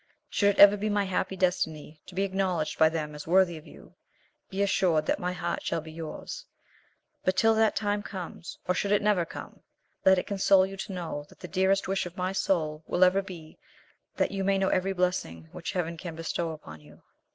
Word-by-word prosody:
Should 205 -1 +3
it - - -7
ever 200 0 +9
be 210 +2 -1
my 205 -1 +2
happy 190 0 -1
destiny 160 -4 -1
to 180 - -11
be 195 - +1
acknowledged 185 -5 -1
by 160 0 +7
them 155 -2 -3
as 150 +1 -9
worthy 180 0 +4
of 155 - -11
you, - - -15 0.6
be 195 +1 0
assured 175 -5 +2
that - - 0
my 180 0 -1
heart 175 -1 -3
shall - - -1
be 160 0 -9
yours; 165 - -7 0.8
but 185 - +1
till 225 0 +5
that 220 -1 +3
time 205 -1 0
comes, 185 -4 -7
or 180 - +3
should 200 +3 -1
it 205 0 +3
never 205 -5 +3
come, - - -10 0.4
let 190 0 +6
it 180 - -1
console 195 -1 +4
you 195 +1 -7
to 195 0 -6
know 160 -5 -5
that - - -19
the 180 - -6
dearest 190 +2 +1
wish 195 -1 -1
of 175 - -12
my 185 +1 -1
soul 160 -5 0
will 180 - +3
ever 185 +2 +5
be 170 -5 -11 0.6
that - - +1
you 195 -1 -2
may 195 0 +2
know 190 0 +1
every 185 +1 +1
blessing 180 - -2
which - - -5
Heaven 170 -2 -2
can 165 0 -7
bestow 165 +1 -2
upon 80 - -9
you." 75 0 -18
185 Hz, 215 wpm, -28 LUFS, 160-195 Hz, 0.8 s, ever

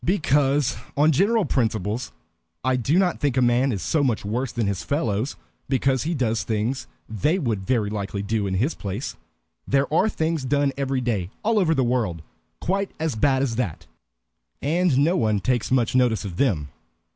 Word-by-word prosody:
"Because, 145 -6 +2 0.2
on 150 +2 +5
general 205 - +3
principles, 110 -4 -1 0.5
I 130 0 +2
do 130 +7 +1
not 185 -2 +2
think 140 -3 0
a - - +5
man 125 +3 +3
is 95 -6 -3
so 155 -3 +1
much 120 -7 0
worse 120 +5 -2
than 120 -3 -1
his 100 -2 -1
fellows 125 -4 -1 0.3
because 130 0 +2
he 165 +2 -1
does 115 -5 0
things 115 +3 -2 0.2
they 130 - 0
would 110 - -2
very 110 -5 +1
likely 100 -1 -3
do 105 -1 -1
in 95 - -1
his 125 - +1
place. 100 -1 -5 0.5
There 140 +2 +1
are 215 - +4
things 160 -5 -1
done 140 +1 +1
every 135 -1 -1
day, 105 -8 -1
all 220 0 +2
over 165 -4 +2
the 135 - +2
world, 115 -10 -1 0.4
quite 195 +3 -1
as 160 -2 -1
bad 130 +4 +2
as 115 -4 -1
that, 100 -11 -3 0.7
and 165 0 +1
no 155 +6 +3
one 110 - +1
takes 120 +4 0
much 130 -1 +2
notice 125 -4 +2
of 90 -4 -6
them. 85 - +1
130 Hz, 180 wpm, -24 LUFS, 110-145 Hz, 0.7 s, on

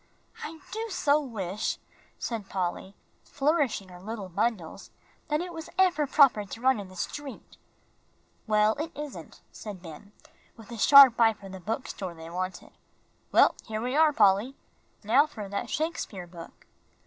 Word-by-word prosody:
"I 320 0 -8
do 445 +1 -3
so 300 -6 +2
wish," 210 -8 -3 0.4
said 220 -5 -5
Polly, 190 +1 -3 0.3
flourishing 280 - 0
her 180 -1 -12
little 210 -1 -6
bundles, 195 -2 -2 0.4
"that 300 0 0
it 355 0 -6
was 320 -1 -8
ever 355 -6 +3
proper 270 -7 +5
to 205 +3 -9
run 260 -1 +3
in 200 - -7
the 185 - -14
street." 275 +9 -7 0.9
"Well, 215 0 +3
it 320 +2 -3
isn't," 295 -2 -8
said 200 -4 -9
Ben, 165 +4 -11 0.5
with 225 0 -13
a 235 - -6
sharp 270 -2 +8
eye 225 -1 +6
for 200 -2 -13
the 190 0 -8
bookstore 195 -3 -5
they 165 0 -10
wanted. 185 +1 -5 0.6
"Well, - - +6
here 215 -1 -3
we 250 +4 -2
are, 310 0 +5
Polly. 210 +2 +3 0.5
Now 255 +8 +4
for 215 -9 -8
that 200 +1 -4
Shakespeare 295 - -3
book!" 170 -1 -13
220 Hz, 155 wpm, -28 LUFS, 195-290 Hz, 0.9 s, sharp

